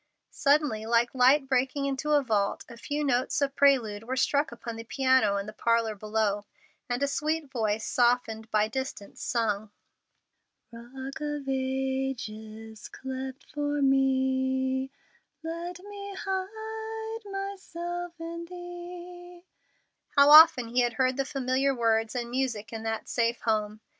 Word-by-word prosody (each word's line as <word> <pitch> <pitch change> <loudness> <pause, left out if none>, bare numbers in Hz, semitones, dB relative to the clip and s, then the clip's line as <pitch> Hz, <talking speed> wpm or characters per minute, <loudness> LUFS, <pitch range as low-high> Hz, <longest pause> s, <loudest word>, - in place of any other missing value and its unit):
Suddenly, 280 -7 +2
like 235 +1 +2
light 265 +2 +5
breaking 265 +2 +1
into 280 +2 -1
a 290 -1 +4
vault 205 -5 0
a 235 - -11
few 290 +5 -3
notes 255 -2 +1
of 280 -1 0
prelude 245 -8 +3
were 255 +2 -2
struck 285 +2 +1
upon 235 -1 -7
the 225 - -7
piano 260 -5 +2
in 200 - -3
the 215 - -8
parlor 230 0 +1
below, 210 -1 -1 0.4
and 245 +3 0
a - - +3
sweet 305 0 -1
voice, 220 -3 -1
softened 240 -3 +1
by 215 -1 +2
distance 260 -4 -6
sung: 215 -3 -1 1.0
"Rock 260 +5 -8
of 295 -2 -3
ages, 260 -5 -3
cleft 265 0 -6
for 290 -1 -1
me, 265 0 +2 0.5
let 340 +2 -5
me 400 0 -8
hide 440 +3 -4
myself 350 -3 -5
in 335 +1 -6
thee," 350 0 -10 0.7
How 280 +1 +8
often 305 -6 +9
he 245 +2 +2
had 240 -1 +1
heard 255 +2 +1
the 275 0 -1
familiar 270 0 0
words 225 -1 +1
and 240 -1 -3
music 235 -5 -2
in 225 - -4
that 225 0 -3
same 235 -1 +1
home! 215 -1 0
265 Hz, 140 wpm, -28 LUFS, 230-300 Hz, 1.0 s, often